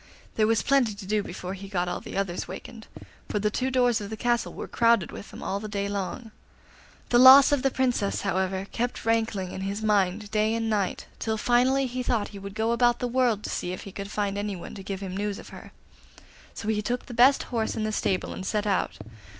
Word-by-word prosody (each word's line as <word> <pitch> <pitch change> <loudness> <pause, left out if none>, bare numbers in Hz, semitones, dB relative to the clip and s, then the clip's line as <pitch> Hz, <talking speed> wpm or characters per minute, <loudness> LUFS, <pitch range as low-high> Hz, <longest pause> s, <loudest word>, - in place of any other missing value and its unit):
There 215 -1 +2
was 225 0 +2
plenty 255 -7 +2
to 200 -1 -9
do 210 +2 +1
before 185 -1 -6
he 195 0 -8
got 180 -2 -1
all 175 - -2
the - - -7
others 190 -3 -2
wakened, 220 +5 -9 0.4
for - - -1
the 210 +1 0
two 260 +4 -1
doors 245 -3 +2
of 200 - -6
the 220 - -5
castle 240 +1 0
were - - -7
crowded 230 -6 +2
with - - -9
them - - -10
all 200 - -2
the 215 - -6
day 200 -1 -2
long. 205 +4 -4 0.8
The 240 - +5
loss 265 +3 +10
of 285 -2 +2
the 270 - +2
Princess, 250 -6 0
however, 190 0 -1
kept 240 0 -3
rankling 220 -5 0
in 190 - -6
his 200 +3 -3
mind 205 0 +1
day 215 0 +2
and 225 -1 -1
night, 200 -3 -1
till 220 -1 -1
finally 250 +4 +3
he 255 0 -3
thought 235 -4 0
he 200 - -9
would 200 0 -8
go 220 +1 +1
about 240 0 +3
the 250 - -2
world 240 -4 +1
to - - -4
see 180 - -3
if - - -7
he 195 - -9
could 200 +1 -6
find 205 -1 -2
anyone 205 -4 -5
to 195 - -8
give 195 0 -5
him 190 -2 -5
news 205 0 -2
of - - -11
her. - - -11 0.8
So 210 - -6
he 215 -1 +1
took 245 +3 -2
the 245 - -9
best 255 +4 +5
horse 225 -2 0
in 220 - -2
the 215 - -1
stable 190 -3 -1
and - - -6
set 210 +2 -1
out. 200 -2 0
215 Hz, 235 wpm, -26 LUFS, 195-240 Hz, 0.8 s, loss